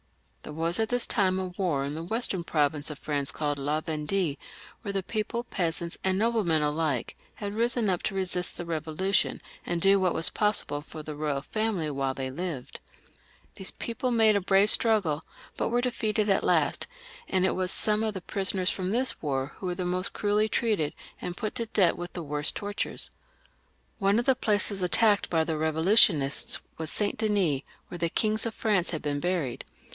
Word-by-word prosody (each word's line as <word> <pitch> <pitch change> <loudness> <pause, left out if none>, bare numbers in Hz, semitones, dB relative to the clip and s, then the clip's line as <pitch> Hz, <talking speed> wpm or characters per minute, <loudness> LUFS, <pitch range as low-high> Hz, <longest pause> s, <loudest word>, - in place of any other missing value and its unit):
There - - -9
was 165 +5 0
at 220 -1 +1
this 245 0 +1
time 190 -3 +2
a 185 -1 -2
war 175 -6 -1
in 140 +2 -3
a 160 - -4
western 195 -2 -1
province 150 -2 0
of 150 - -6
France 140 -2 -2
called 145 -2 -2
La 145 +3 0
Vendue, 155 +1 -1 0.5
where 200 - -4
the 195 -1 -2
people, 220 +4 -2
peasants 170 -6 -2
and 190 0 +1
noblemen 205 -8 +2
alike, 150 -4 -1 0.2
had 205 -1 -5
risen 235 +1 +2
np 185 -3 +1
to 195 - -2
resist 180 -2 -1
the 175 - -4
Bevolution, 165 +4 0 0.2
and 175 -1 -2
do 195 +3 +5
what 185 -2 +1
was 165 - 0
possible 210 -8 0
for 155 +1 -9
the 150 0 -6
royal 145 -2 -2
family 210 -8 -1
while 135 -1 -1
they 130 -1 -4
lived. 155 -3 -5 0.8
These 190 - -1
people 250 +2 -3
made 225 -3 +4
a 200 - +2
brave 195 +3 +4
struggle, 195 -10 +2 0.3
but - - -1
were 240 - +2
defeated 220 -4 0
at 195 - +3
last, - - +2 0.4
and 185 0 +2
it - - +2
was 185 0 0
some 215 0 +2
of 215 -2 -1
the 190 - -4
prisoners 190 0 0
from 185 -1 -3
this 250 +5 0
war 135 -2 -2
who 190 - -5
were 180 - -2
the 180 0 -3
most 180 +1 -1
cruelly 210 +1 +1
treated, 210 -10 0 0.3
and 175 0 -4
put 215 - -3
to 230 - -1
death 195 -5 +3
with 175 0 -7
the 175 - -5
worst 150 0 -1
tortures. 205 0 -3 0.9
One 200 +1 +3
of 240 - +1
the 265 - +4
places 205 -3 +1
attacked 205 +3 +3
by 165 -2 +2
the 160 -1 -2
Revolutionists 160 -2 +4 0.2
was 160 -1 0
Saint 205 +3 +1
Denis, 200 - +2 0.3
where 175 - -7
the 170 0 +1
kings 215 +5 +1
of 225 - -5
France 205 -6 +1
had 160 - -4
been 145 -1 -1
buried. 170 -7 -1
185 Hz, 190 wpm, -28 LUFS, 155-210 Hz, 0.9 s, do